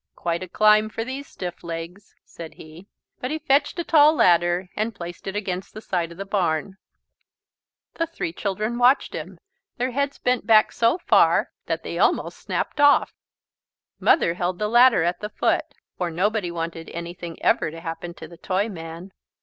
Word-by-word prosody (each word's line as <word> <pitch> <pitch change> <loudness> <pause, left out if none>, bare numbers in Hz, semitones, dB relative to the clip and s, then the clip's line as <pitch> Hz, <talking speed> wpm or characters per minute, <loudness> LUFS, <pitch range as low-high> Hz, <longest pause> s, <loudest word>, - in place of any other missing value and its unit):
"Quite 170 0 -2
a 185 - -5
climb 215 +3 +4
for 225 - -4
these 270 +3 -6
stiff 180 -2 -7
legs," 170 +4 -7
said 165 -2 -10
he. 160 +5 -13 0.3
But 255 - -3
he 310 - -2
fetched 290 0 +1
a 345 - -1
tall 310 -1 +5
ladder 175 - +3
and 215 +1 -2
placed 175 0 -8
it 195 - -4
against 190 -3 -4
the - - -6
side 175 -5 -2
of 170 - -12
the 195 - -5
barn. 190 -2 -1 1.2
The 330 - -2
three 240 - -5
children 215 +5 -2
watched 250 +3 +4
him, 175 +4 -7 0.4
their 250 +1 -1
heads 280 +2 -1
bent 250 -3 0
back 215 -2 +5
so 230 +8 +2
far 350 - +3 0.2
that - - -2
they - - -5
almost - - +1
snapped - - -3
off. 290 0 +5 0.9
Mother 170 - +3
held 180 +1 -2
the 210 - -1
ladder 240 -4 +5
at 175 +1 -1
the 210 - -5
foot, - - 0 0.3
for 180 -2 -1
nobody 190 +3 0
wanted 165 -1 -5
anything 170 0 -7
ever - - +2
to 165 +1 -9
happen 165 +1 -6
to - - -10
the 170 - -14
Toyman. 185 -2 -4
190 Hz, 175 wpm, -23 LUFS, 170-230 Hz, 1.2 s, tall